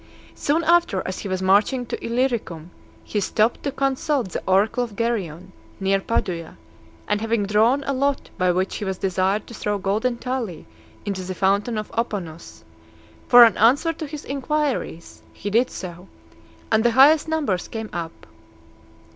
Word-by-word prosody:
Soon 315 +4 0
after, 340 - +3
as 185 - -4
he - - -5
was 185 0 -2
marching 210 +7 +3
to - - -6
Illyricum, 230 -9 -2 0.3
he 210 - -2
stopped 215 +3 +1
to 280 - -2
consult 275 -3 -1
the - - -4
oracle 200 +6 +2
of 225 -4 -7
Geryon, 190 -6 -3 0.3
near 195 0 +2
Padua; 180 -6 -3 0.5
and 210 0 0
having 225 -2 0
drawn 225 +7 +3
a 275 - -1
lot 275 +1 -1
by 185 0 +2
which 185 +2 -1
he - - -5
was 190 -2 -3
desired 190 +2 0
to - - -12
throw 210 -2 -2
golden 215 +5 -1
tali 245 -9 -4 0.4
into 200 -2 -3
the 185 0 -5
fountain 200 +5 +1
of 215 - -5
Aponus, 190 -8 -4 0.6
for 245 -1 +9
an 230 - +5
answer 285 +9 +4
to 315 -1 -6
his 295 0 -8
inquiries, 280 - -3
he 205 - -5
did 235 +4 +3
so, 180 0 -8 0.6
and 220 0 +3
the 240 - +4
highest 295 +4 +6
numbers 290 - -1
came 220 -1 -6
up. 165 -1 -6
215 Hz, 165 wpm, -22 LUFS, 190-255 Hz, 0.6 s, for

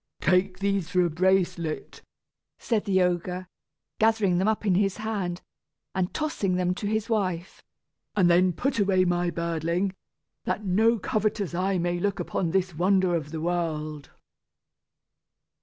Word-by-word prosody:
"Take 185 +1 +2
these 195 -3 -1
for 180 -1 +3
a 170 - -1
bracelet," 175 -2 0 0.6
said 220 -3 -1
the 190 -3 +3
ogre, 180 +1 -1 0.5
gathering 220 -5 +3
them 190 - +1
up 220 0 0
in 195 - +3
his 195 +1 +1
hand, 200 -5 -3 0.5
and 185 -1 -1
tossing 255 -12 -1
them 180 0 +1
to 205 +2 -4
his 220 +1 -1
wife; 185 -6 -2 0.5
"and 190 -4 +4
then 180 +1 +4
put 250 - -1
away 190 -2 +3
my 175 0 +1
birdling, 170 +3 -1 0.5
that 215 - -2
no 220 +5 +3
covetous 210 -2 -1
eye 185 +2 0
may 175 0 -1
look 200 +2 -1
upon 175 - -1
this 185 +1 0
wonder 185 +2 +2
of 155 -4 -2
the 160 0 -5
world." 155 -4 -2
185 Hz, 145 wpm, -26 LUFS, 175-200 Hz, 0.6 s, and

